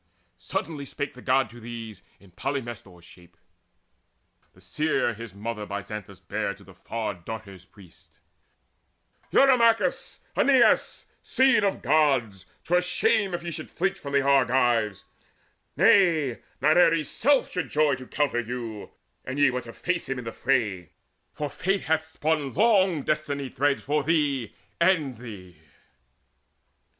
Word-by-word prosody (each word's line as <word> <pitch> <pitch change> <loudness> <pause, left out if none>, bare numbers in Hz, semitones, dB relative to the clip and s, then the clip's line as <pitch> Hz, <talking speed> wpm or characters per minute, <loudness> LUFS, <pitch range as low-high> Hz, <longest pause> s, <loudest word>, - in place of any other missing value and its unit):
Suddenly 140 - -4
spake 145 +1 -5
the 125 - -13
God 130 0 +2
to 120 - -12
these 115 -3 -8 0.2
In 100 -2 -20
Polymestor's 120 -7 -6
shape, 90 -2 -17 1.2
the - - -21
seer 155 -5 -1
his 110 -2 -10
mother 105 +1 -5
By 100 0 -4
Xanthus 100 -2 -8
bare 105 -1 -3
to 100 - -18
the 95 0 -16
Far 105 +3 -4
darter's 95 0 -9
priest: 95 -4 -19 1.2
"Eurymachus, 235 -4 +3
Aeneas, 265 -4 +3 0.2
seed 265 -4 +3
of 200 - -1
Gods, 125 -12 +1 0.2
'Twere 180 +1 +2
shame 185 +1 +1
if 170 - -6
ye 170 - -4
should - - -7
flinch 190 +2 -2
from 140 -1 -5
Argives! 125 -7 +2 0.7
Nay, 160 - +4 0.2
Not 155 +5 +4
Ares' 165 -3 +4
self 280 +2 +2
should 180 - -3
joy 150 -1 +2
to 130 0 -5
encounter 140 -2 0
you, 115 -3 -6 0.3
An 130 +2 -5
ye 145 -2 +4
would 125 0 -4
face 175 -4 -2
him 135 - -2
in 125 - -6
the 115 - -4
fray; 105 - -1 0.4
for 150 - -4
Fate 195 +6 -1
Hath 160 0 0
spun 150 -4 -2
long 190 -7 +3
destiny 145 -3 -2
threads 140 +3 0
for 150 +2 0
thee 145 -8 0 0.2
and 165 - +2
thee." 100 -8 -11
135 Hz, 140 wpm, -26 LUFS, 110-160 Hz, 1.2 s, Nay